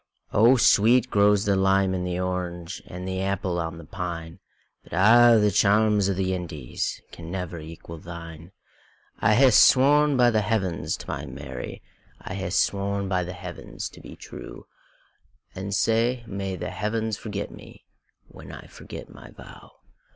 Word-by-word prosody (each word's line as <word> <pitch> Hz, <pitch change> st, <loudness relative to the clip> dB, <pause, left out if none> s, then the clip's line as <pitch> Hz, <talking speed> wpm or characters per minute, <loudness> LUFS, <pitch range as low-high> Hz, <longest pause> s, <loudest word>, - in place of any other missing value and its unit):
O 115 Hz, +5 st, +6 dB
sweet 115 Hz, +2 st, +4 dB
grows 100 Hz, 0 st, +3 dB
the 100 Hz, -1 st, +2 dB
lime 95 Hz, 0 st, +2 dB
and 90 Hz, -1 st, -2 dB
the 90 Hz, 0 st, -2 dB
orange, 90 Hz, -1 st, -4 dB
And 90 Hz, +1 st, -7 dB
the 95 Hz, 0 st, -2 dB
apple 95 Hz, -2 st, -1 dB
on 80 Hz, 0 st, -4 dB
the 85 Hz, -, -11 dB
pine; 85 Hz, -1 st, -6 dB, 0.4 s
But -, -, -15 dB
a' 115 Hz, +6 st, +6 dB
the 105 Hz, -1 st, +3 dB
charms 105 Hz, 0 st, +3 dB
o' -, -, +1 dB
the 95 Hz, 0 st, -1 dB
IndiesCan 85 Hz, -1 st, -5 dB
never 90 Hz, -1 st, -5 dB
equal 80 Hz, +1 st, -10 dB
thine.I 85 Hz, +5 st, -5 dB
hae 130 Hz, +1 st, +6 dB
sworn 145 Hz, +3 st, +5 dB
by 120 Hz, -1 st, +5 dB
the 110 Hz, -1 st, +2 dB
Heavens 95 Hz, -5 st, -1 dB
to -, -, -11 dB
my -, -, -5 dB
Mary,I 65 Hz, +6 st, -9 dB
hae 95 Hz, 0 st, -4 dB
sworn 100 Hz, +1 st, 0 dB
by 90 Hz, -1 st, 0 dB
the 90 Hz, +1 st, -6 dB
Heavens 90 Hz, -1 st, -7 dB
to -, -, -15 dB
be -, -, -11 dB
true; -, -, -10 dB, 0.9 s
And 95 Hz, +1 st, -6 dB
sae 115 Hz, +4 st, +1 dB
may 95 Hz, -3 st, -4 dB
the 90 Hz, -, -5 dB
Heavens 110 Hz, +1 st, -2 dB
forget 105 Hz, -2 st, -5 dB
me, -, -, -14 dB, 0.4 s
When -, -, -12 dB
I -, -, -10 dB
forget -, -, -10 dB
my -, -, -13 dB
vow! -, -, -14 dB
95 Hz, 155 wpm, -25 LUFS, 90-105 Hz, 0.9 s, O